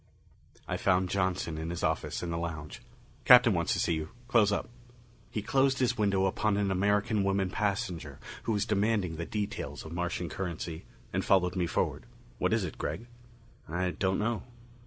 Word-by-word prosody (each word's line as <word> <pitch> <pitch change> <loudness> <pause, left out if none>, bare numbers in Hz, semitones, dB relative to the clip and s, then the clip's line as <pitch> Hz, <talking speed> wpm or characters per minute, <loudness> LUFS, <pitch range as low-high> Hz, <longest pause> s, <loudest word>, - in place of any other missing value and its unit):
I - - -1
found 95 0 +2
Johnson 90 -4 0
in 80 +1 -4
his 85 - -4
office - - -1
in 85 - -3
the 85 - -1
lounge. 80 -3 -5 0.4
"Captain 125 -3 +8
wants 85 -2 0
to - - -1
see 85 - +2
you. 80 -1 -3 0.2
Close 110 -4 +4
up." 100 - -1 0.6
He 105 - -3
closed 135 +3 +3
his 125 -2 +2
window 100 -3 +2
upon 100 +2 +1
an 100 -1 +1
American 100 +2 +2
woman 95 -1 +1
passenger 95 - -2 0.3
who - - 0
was 105 -1 +1
demanding 105 -5 +1
the 85 - -4
details 100 - -4
of 80 - -8
Martian 90 0 -2
currency, 85 -1 -5 0.3
and - - 0
followed 90 -1 +3
me 90 -2 +1
forward. - - -1 0.3
"What - - +1
is - - +2
it, - - -5
Gregg?" 80 +10 -3 0.6
"I 90 +2 0
don't 95 +1 0
know." 115 +2 0
95 Hz, 180 wpm, -30 LUFS, 85-105 Hz, 0.6 s, Captain